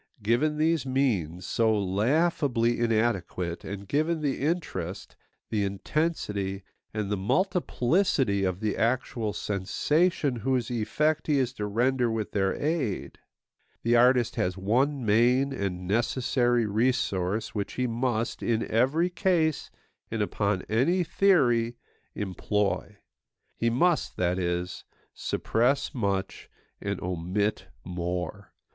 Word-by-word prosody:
Given 130 +8 +2
these 160 -1 +2
means, 105 - 0
so 115 +3 +2
laughably 120 - +1
inadequate, 110 -7 0
and 100 0 -7
given 155 - 0
the 140 -3 -1
interest, 105 - -3 0.4
the 105 -2 +1
intensity, 100 - -2 0.3
and 105 -2 -3
the 105 - +1
multiplicity 135 - +1
of 95 +1 -1
the 110 -1 0
actual 115 -1 0
sensation 140 - 0
whose 125 0 -1
effect 150 +7 0
he 150 -2 +3
is 130 -2 0
to 105 -4 -4
render 120 +3 +1
with 110 -2 -2
their 95 -2 +1
aid, 145 - -2 0.6
the 115 +1 +3
artist 125 0 +4
has 90 +1 0
one 125 +7 +1
main 125 +6 +3
and 90 -6 -3
necessary 120 +2 +1
resource 110 -3 0
which 100 -2 -3
he 125 - -1
must, 120 -1 -1
in 115 -1 0
every 140 +10 +2
case 170 -4 +1 0.4
and 110 -2 -1
upon 100 -2 -1
any 140 - +2
theory, 125 -11 +3 0.4
employ. 105 +1 -1 0.6
He 115 - +1
must, 165 +8 +1
that 90 +1 +1
is, 90 0 -2 0.3
suppress 135 +5 0
much 100 -5 -2 0.3
and 100 -2 -3
omit 90 +4 -1 0.2
more. 90 +2 -4
115 Hz, 115 wpm, -27 LUFS, 100-135 Hz, 0.6 s, artist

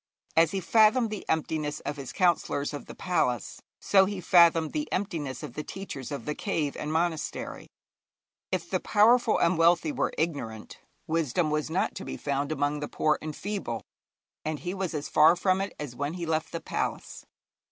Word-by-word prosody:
As 165 -1 +5
he 195 - -2
fathomed 220 +4 +4
the 210 - -6
emptiness 155 -2 -1
of 145 +1 -4
his 135 -3 -6
counsellors 170 -5 +1
of 145 - -7
the - - -9
palace, 140 - -1 0.2
so 195 -1 +5
he 200 0 -4
fathomed 170 -2 +5
the 300 0 -3
emptiness 165 - -3
of - - -7
the 150 - -4
teachers 150 -8 -7
of 140 - -5
the 150 - -1
cave 155 -6 -2
and 150 - -4
monastery. 160 -1 -2 0.8
If - - -1
the - - 0
powerful 230 +2 +4
and 170 0 +2
wealthy 165 -1 +4
were - - -1
ignorant, 130 -10 -3 0.3
wisdom 160 0 0
was 150 0 -1
not 175 +4 0
to - - -7
be - - -6
found 140 +1 -2
among 145 0 0
the 145 - -4
poor 155 -1 +1
and 155 -1 -5
feeble, 195 - -4 0.6
and 155 0 -2
he 180 0 -3
was 190 -4 -3
as 150 -1 -3
far 155 +3 +6
from 185 +1 +1
it 200 - -3
as 145 -5 -6
when 145 +5 -3
he 175 -2 -4
left 160 -1 -1
the 165 - -4
palace. - - -4
160 Hz, 185 wpm, -28 LUFS, 145-185 Hz, 0.8 s, far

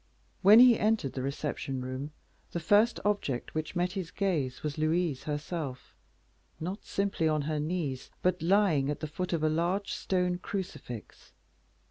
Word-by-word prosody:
When 205 +3 +8
he 245 -1 +8
entered 215 - +1
the 130 - -3
reception 140 0 -3
room, 130 +3 -4 0.4
the 170 - -1
first 205 +7 +4
object 200 -12 -1
which 155 +3 -3
met 175 +1 +1
his 185 -4 -4
gaze 155 -11 -1
was 150 0 -3
Louise 155 -2 0
herself, 150 -3 -4 0.7
not 185 +6 -4
simply 195 -5 0
on 155 -2 +1
her 155 +1 -1
knees, 150 -5 -3
but 180 -1 +2
lying 165 -6 +3
at 150 - -2
the - - -3
foot 180 +4 -4
of 165 -3 0
a - - +4
large 175 +6 0
stone 180 -1 0
crucifix. 180 - -7
165 Hz, 155 wpm, -30 LUFS, 145-190 Hz, 0.7 s, When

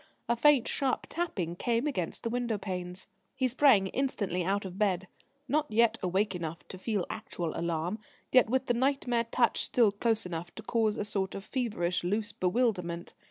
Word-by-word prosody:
A 235 - +2
faint, 275 0 +5
sharp 270 -3 0
tapping 190 - -2
came 235 +6 0
against 215 - -2
the 230 - -1
window 240 -2 -1
panes. 180 -2 -5 0.3
He 260 - +1
sprang 255 -5 +5
instantly 200 -9 -1
out 200 +3 0
of 190 +1 -7
bed, 190 -3 +1 0.4
not 300 +3 +1
yet 225 +1 +3
awake 190 +3 +1
enough 165 -2 -5
to 185 - -8
feel 205 -2 -1
actual 175 -7 -4
alarm, 170 +4 -2 0.3
yet 255 -3 +5
with 260 +2 +1
the 245 - +2
nightmare 245 -2 +1
touch 235 -1 +2
still 230 -4 +3
close 220 +1 0
enough 175 0 -6
to 220 - -8
cause 220 -1 +1
a 210 - -2
sort 195 -2 -2
of 195 - -6
feverish, 210 -10 -1
loose 210 +5 -1
bewilderment. 180 -4 0
210 Hz, 175 wpm, -30 LUFS, 180-240 Hz, 0.4 s, faint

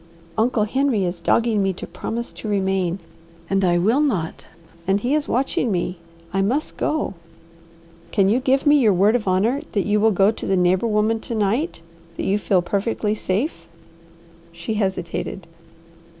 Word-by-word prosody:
"Uncle 225 +1 +2
Henry 255 -1 +1
is 175 -1 -4
dogging 225 +4 +2
me 195 -1 +1
to - - -7
promise 235 +1 -5
to - - -8
remain, 190 -3 0 0.5
and 195 0 +2
I 175 -1 +3
will 220 +10 +3
not, 205 - -1 0.4
and 195 +1 +3
he 245 +6 -1
is 300 -1 +1
watching 250 -2 0
me. 180 -1 -2 0.3
I 195 - +2
must 255 +10 -1
go 310 -8 -1 0.5
" 170 0 -26
"Can 195 -3 +3
you 225 +5 +3
give 270 +2 +1
me 290 0 +6
your 220 -6 +4
word 200 +5 +4
of 225 -5 -1
honour 215 +10 +2
that 200 - +1
you 210 0 +2
will 220 +2 +4
go 195 0 +4
to - - -7
the 190 - +2
neighbour 180 +4 +2
woman 215 +1 +1
to 230 - -5
night; 220 - -1 0.3
that - - -3
you 200 +2 +1
feel 190 -3 +2
perfectly 210 +3 -1
safe?" 195 - -2 0.8
She 170 +6 -5
hesitated. 190 -3 -3
205 Hz, 175 wpm, -22 LUFS, 185-230 Hz, 0.8 s, me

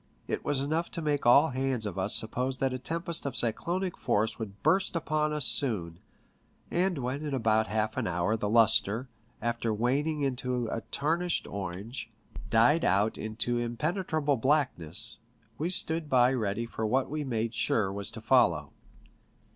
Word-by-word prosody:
It - - -3
was 145 -2 0
enough 160 +4 -1
to - - -2
make 145 -4 0
all 140 +6 +6
hands 130 -3 -1
of 100 -2 -4
us 95 +2 +2
suppose 125 +4 -1
that 135 -1 0
a 130 - -4
tempest 165 +4 -1
of 130 - -5
cyclonic 175 - 0
force 110 +2 0
would 100 -3 -8
burst 190 -1 +2
upon 155 -2 0
us 150 -3 +3
soon, 110 - +2 0.7
and 180 -1 +1
when 135 +3 -3
in 145 -3 -2
about 110 -3 +2
half 110 0 -1
an 125 -4 -1
hour 90 +5 0
the 105 -2 -2
lustre, 115 +2 +4 0.3
after 120 -1 -1
waning 140 +7 0
into 125 -2 -2
a 115 - -3
tarnished 170 +4 0
orange, 100 +5 -6 0.4
died 120 +10 +4
out 100 +4 +2
PICTURES - - -7
AT - - -3
SEA, - - -8
63 120 +2 0
into 120 0 0
impenetrable 150 - -1
blackness, 115 - +2 0.4
we 160 +4 -1
stood 160 -3 -1
by 125 -1 +4
ready 110 -2 -2
for 115 -1 -6
what 125 +5 +1
we 150 +1 -3
made 115 -3 -2
sure 100 -5 0
was 100 -2 -5
to - - -9
follow. - - +2
125 Hz, 175 wpm, -29 LUFS, 110-150 Hz, 0.7 s, all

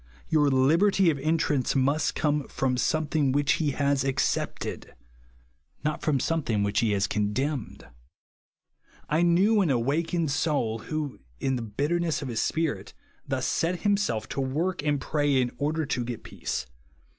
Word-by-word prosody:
Your 150 -3 +3
liberty 165 +8 +4
of 145 - -4
entrance 150 -3 +1
must 140 +3 +1
come 150 -2 0
fro'in 130 -2 -1
something 155 -2 +1
which 145 +1 +2
he 150 - +1
has 140 -1 +1
accepted; 135 -1 -2 0.9
not 150 0 -1
from 145 -4 +1
something 125 -10 0
which 100 0 +1
he 115 - +2
has 100 -1 +1
condemned. 115 +7 -2 1.2
I 155 +3 +2
knew 190 +5 +4
an 180 - +1
awakened 150 +6 0
soul 140 -7 0
who, 150 +3 -4 0.2
in 135 - 0
the 125 - -3
bitterness 150 +9 -1
of 135 - -5
his 115 -2 -1
spirit, 160 -2 -2 0.3
thus - - -1
set 170 +1 0
himself 200 - 0
to 135 - -2
work 155 +7 -1
and 145 -1 +1
pray 145 -1 +1
in 125 -1 0
order 155 +2 0
to 125 -3 -1
get 120 -1 -6
peace. - - -4
145 Hz, 150 wpm, -27 LUFS, 130-160 Hz, 1.2 s, liberty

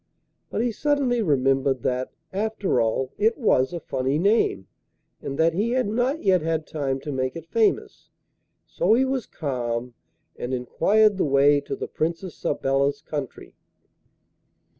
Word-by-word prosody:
But 225 - -1
he 240 - 0
suddenly 270 -2 +1
remembered 135 - +1
that, 130 0 -1 0.2
after 205 - 0
all, 115 +3 0
it 220 +2 +2
was 155 - +2
a 175 - -4
funny 135 -1 -1
name, 180 - +2 0.6
and 140 - -5
that 165 0 +3
he 215 +7 0
had 255 -3 +1
not 245 +8 0
yet 185 -3 +4
had 160 -1 -1
time 135 -3 -2
to 150 - -5
make 130 -1 -2
it 165 -1 -7
famous; 220 +5 0 0.6
so 485 - +2
he 260 +3 +3
was 265 -3 -2
calm, 125 -4 -3 0.4
and 125 +2 -3
enquired 205 - +2
the - - +3
way 140 +1 +4
to - - -5
the - - -5
Princess 165 +2 -3
Sabella's 140 0 0
country. 145 -5 -6
155 Hz, 150 wpm, -24 LUFS, 135-215 Hz, 0.6 s, yet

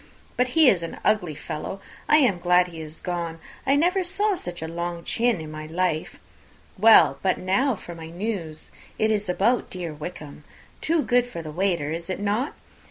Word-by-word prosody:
But 250 - +2
he 315 -3 +7
is 190 -8 +5
an 165 - -6
ugly 180 -8 +2
fellow! 155 +6 -5 0.3
I - - +7
am 240 - +3
glad 180 0 +4
he 165 -2 -8
is 155 0 -7
gone. 170 -2 -3 0.3
I 275 - +5
never 360 +6 +2
saw 400 +4 +1
such 175 - -5
a - - -3
long 170 +1 -4
chin 235 -1 +1
in 155 -1 -7
my 155 0 -7
life. 165 -1 -1 0.6
Well, 220 +3 +6
but 185 -2 +1
now 245 +8 +1
for 175 -2 -9
my 165 -1 -9
news: 175 -4 -4 0.3
it 220 0 +2
is 210 -3 -1
about 215 +7 +2
dear 175 -4 -5
Wickham; 150 -1 -8 0.4
too 325 -1 +2
good 245 0 +2
for 170 -9 -7
the 155 - -6
waiter, 170 -3 0
is 170 +2 -5
not 210 +6 0
it? - - -12
180 Hz, 190 wpm, -25 LUFS, 165-230 Hz, 0.6 s, he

